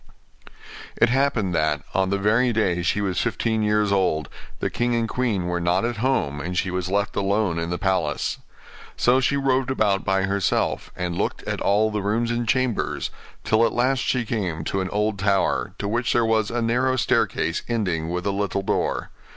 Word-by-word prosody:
It 115 - +5
happened 125 -7 +1
that, 75 -2 0
on 95 -1 +1
the 100 - +1
very 115 +5 +2
day 95 -6 +1
she 95 +4 0
was 95 -4 0
fifteen 110 -1 0
years 105 -1 +2
old, 90 -7 +1 0.3
the - - -2
king 120 0 0
and 115 -1 0
queen 115 -7 -1
were 90 0 -1
not 90 +4 +1
at 120 -1 -2
home, 110 - 0
and 90 +3 -4
she 95 - 0
was 90 0 -2
left 100 +2 0
alone 100 -3 +1
in 85 0 -3
the 90 - -2
palace. 95 -1 -1 0.6
So 125 +2 +4
she 140 +2 +1
roved 135 -1 +1
about 105 -7 +1
by 95 -1 +1
herself, 100 0 0
and 90 -2 -3
looked - - -2
at - - -3
all 105 +2 +2
the 105 -1 -2
rooms 115 +4 0
and 120 0 -1
chambers, 130 -3 0 0.3
till 110 +1 +3
at 115 - +2
last 130 +2 +2
she 125 -2 0
came 95 -9 -2
to 95 +4 -1
an 95 - -3
old 105 0 -1
tower, 100 0 +1
to 100 - -3
which 120 +3 0
there 120 -1 +3
was 110 -1 +1
a 120 0 -1
narrow 125 +3 +1
staircase 85 -8 +1
ending 90 -9 -1
with 90 +1 -3
a 100 - +1
little 100 0 -1
door. - - -1
105 Hz, 195 wpm, -23 LUFS, 95-120 Hz, 0.6 s, It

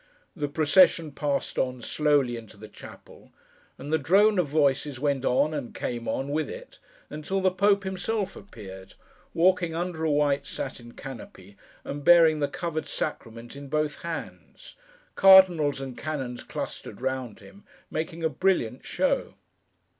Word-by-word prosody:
The 150 -4 -2
procession 155 +1 +4
passed 140 -1 -2
on, 125 -2 -2
slowly, 145 -5 +1
into 110 -2 -11
the 110 +1 -11
chapel, 105 - -14 0.5
and 145 +4 -6
the 160 - +3
drone 195 +7 +4
of 175 - +1
voices 140 -2 +1
went 140 -1 0
on, 145 +5 +2
and 140 -5 -5
came 120 -1 -4
on, 135 +1 -2
with 155 +2 -1
it, - - -10 0.3
until 160 +6 -3
the 190 -1 +2
Pope 200 +2 +2
himself 190 +2 -3
appeared, 95 - -11 0.4
walking 175 -1 +2
under 170 -1 -3
a 160 - +1
white 145 -1 +1
satin 120 -4 -6
canopy, 105 -7 -11 0.3
and 145 0 -6
bearing 165 -2 +6
the 145 - +1
covered 155 +2 -4
Sacrament 115 -4 -5
in 140 0 -9
both 150 +1 -2
hands; 170 -1 -8 0.4
cardinals 180 -7 +6
and 135 -2 -6
canons 135 -5 -5
clustered - - -7
round 130 -3 -3
him, 200 +3 -16 0.3
making 165 +1 -4
a - - +4
brilliant 185 +6 0
show. - - -1
150 Hz, 145 wpm, -26 LUFS, 130-175 Hz, 0.5 s, bearing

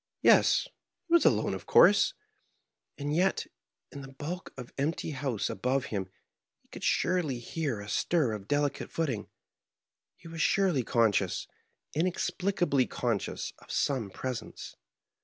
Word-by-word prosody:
Yes, - - +6 0.4
he 340 - -3
was 340 - +6
alone, - - +3
of - - -7
course; - - +6 0.8
and 145 +1 -2
yet, 190 +3 +2 0.5
in 140 - -8
the 135 - -9
bulk 160 +7 -6
of 125 -2 -9
empty 155 +3 -2
house 135 -6 -2
above 130 +6 -1
him, 95 -2 -2 0.5
he - - -35
could - - -10
surely 170 -8 +1
hear 130 -1 -3
a 100 - -8
stir 150 +2 +1
of 105 -2 -6
delicate 145 -1 0
footing 135 -11 -2 0.5
— - - -54
^he - - -21
was 165 0 -5
surely 190 -8 +3
conscious, 115 -3 +1 0.5
inex 175 +3 0
plicably 175 -9 +1
conscious, 115 -5 -2
of - - -19
some 130 -8 0
presence. 125 +2 -6
140 Hz, 140 wpm, -29 LUFS, 120-165 Hz, 0.8 s, Yes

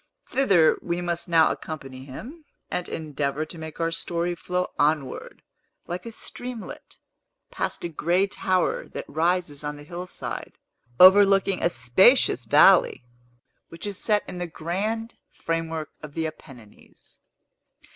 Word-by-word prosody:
Thither 195 -12 +3
we 170 0 -2
must 175 0 -3
now 165 -2 +5
accompany 135 -4 -7
him, 250 - -10 0.3
and 180 - -3
endeavor 150 -1 -3
to 165 - -9
make 160 -1 -8
our 165 0 0
story 170 +1 -2
flow 180 +1 -3
onward, 145 -2 -1 0.4
like 180 +5 -6
a - - -6
streamlet, 245 0 -8 0.5
past - - -4
a - - -1
gray 170 +4 +1
tower 185 -2 -1
that - - -7
rises 165 -2 -1
on 150 0 -4
the 145 - -11
hillside, 175 +4 -6 0.5
overlooking 195 0 +6
a - - +3
spacious 125 - +4
valley, 150 - +5 0.6
which 165 - -8
is 205 -2 -3
set 210 -2 +2
in 180 - -7
the 175 - -3
grand 205 +8 -3 0.2
framework 165 -1 -3
of 150 -2 -10
the 165 -1 -1
Apennines. 135 -8 -12
170 Hz, 135 wpm, -25 LUFS, 155-185 Hz, 0.6 s, overlooking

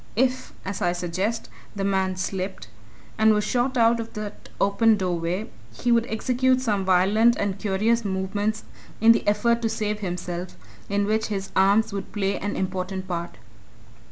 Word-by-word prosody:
If, 255 +2 0
as 200 0 -4
I 175 0 +2
suggest, 185 +6 -2 0.3
the 200 - -2
man 190 -1 +1
slipped, 185 - -4 0.5
and 220 0 +5
was 210 - +1
shot 250 +4 0
out 230 0 +4
of 225 0 -6
that 210 -1 -7
open 215 +2 +4
doorway, 180 +2 -2 0.3
he 245 - +1
would 235 0 +3
execute 255 +3 +1
some 210 -6 0
violent 200 +6 +4
and 200 -1 -2
curious 220 +4 +1
movements 205 +2 -2 0.4
in 225 +1 +7
the 230 - +2
effort 235 +3 +2
to 225 - 0
save 210 -1 -2
himself 180 -2 -4 0.3
in 200 0 +1
which 215 +1 0
his 195 -2 -4
arms 200 +3 +3
would 195 -1 -5
play 200 -1 -1
an 205 +1 -3
important 190 0 -3
part. 170 -1 -4
205 Hz, 160 wpm, -24 LUFS, 190-225 Hz, 0.5 s, in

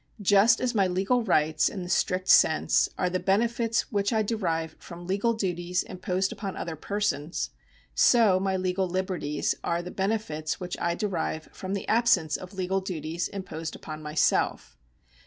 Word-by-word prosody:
Just 205 +4 +5
as 255 -1 0
my 200 -4 +3
legal 190 +7 +1
rights 155 -6 +2
(in 190 -3 -6
the - - -7
strict 185 0 0
sense) 155 - +4
are 180 - +1
the 185 +1 -1
benefits 230 +4 +1
which 200 0 0
I 220 -2 +2
derive 165 -7 -2
from 175 0 -10
legal 205 +5 +1
duties 180 -3 -1
imposed 185 +1 -2
upon 195 -2 -5
other 165 -2 -4
persons, 175 -3 -2 0.4
so 220 -6 +5
my 190 0 0
legal 185 0 0
liberties 180 -5 -1
are 170 +1 -1
the 180 - -7
benefits 190 -7 -2
which 180 -1 -4
I 170 0 0
derive 170 -5 -3
from 190 +1 -4
the 200 - -5
absence 215 -9 +3
of 185 +1 -8
legal 190 +1 -1
duties 170 -2 -3
imposed 165 -5 -6
upon 155 0 -8
myself. 150 0 0
185 Hz, 160 wpm, -27 LUFS, 170-200 Hz, 0.4 s, Just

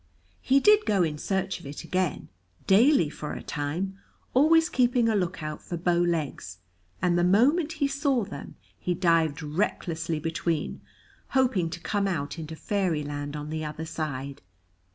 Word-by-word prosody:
He 270 +1 +4
did 420 +7 +5
go 200 -4 +3
in 150 -3 -2
search 190 +2 -1
of - - -11
it 145 - -7
again, 185 -2 -2 0.4
daily 225 - +5
for 150 0 -6
a - - -7
time, 170 +7 -3 0.3
always 320 +5 +5
keeping 245 -6 +2
a 225 - +2
look 180 -4 -1
out 155 -1 -5
for 175 - -5
bow 170 +1 +1
legs, 155 - -1 0.5
and 175 -1 +3
the - - +3
moment 285 - +3
he 290 -3 0
saw 275 -3 +1
them, 145 - -9 0.2
he 180 - -1
dived 165 -4 +2
recklessly 165 0 -2
between, 165 0 -2 0.6
hoping 230 -11 +2
to 165 - -6
come 200 +3 -1
out 165 -3 -3
into 160 0 -6
fairyland 150 -7 -2
on 150 0 -5
the 155 0 -3
other 155 +1 -5
side. 140 -4 -5
175 Hz, 160 wpm, -27 LUFS, 155-210 Hz, 0.6 s, did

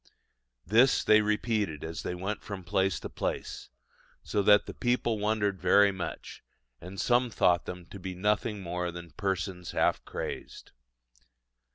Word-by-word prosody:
This 115 +8 +4
they 110 0 +6
repeated 105 -6 -1
as 80 0 -5
they 90 - -4
went 95 +4 -4
from 100 -3 -7
place 95 +2 0
to - - -5
place, - - -4 0.5
so 105 - 0
that 105 +1 +5
the - - -7
people 120 -2 0
wondered 105 -2 0
very 100 0 +5
much; 95 -2 -7 0.4
and 95 +2 -9
some 125 0 +2
thought 90 -5 +2
them 90 -1 -7
to 100 - -8
be 95 0 -6
nothing 105 +2 0
more 90 0 -3
than 85 -1 -9
persons 95 -3 -3
half - - +1
crazed. - - -6
100 Hz, 150 wpm, -29 LUFS, 90-105 Hz, 0.5 s, they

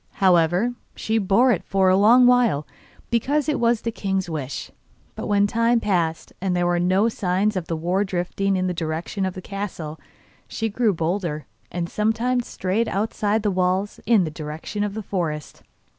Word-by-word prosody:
However, 185 +3 +3 0.2
she 220 +1 0
bore 215 +6 +4
it 190 - 0
for 190 0 +1
a 185 - +5
long 230 +6 +6
while 240 -12 +3 0.5
because 275 +6 +1
it 300 - 0
was 235 -1 +2
the 230 - -2
king's 195 -3 -2
wish, 145 -5 -5 0.4
but - - -6
when 205 -1 +3
time 230 +3 +2
passed 170 -7 -1
and 185 -1 0
there 175 0 +1
were 175 0 +1
no 185 +5 +3
signs 200 -1 0
of 180 -3 -3
the 165 - -2
war 175 +5 0
drifting 195 +1 -1
in 185 0 0
the 180 - -1
direction 170 +4 -3
of 185 - -5
the 185 - -8
castle, 180 -6 -5 0.5
she 225 -1 -2
grew 220 +1 +1
bolder, 165 -3 -2 0.3
and 175 -1 -2
sometimes 230 +5 0
strayed 195 +5 -1
outside 210 +1 -1
the 205 - +1
walls, 185 +2 0
in 225 -5 +5
the 160 - -3
direction 155 +7 -5
of 205 -1 -3
the 220 - -4
forest. 165 -6 -4
195 Hz, 180 wpm, -23 LUFS, 175-220 Hz, 0.5 s, long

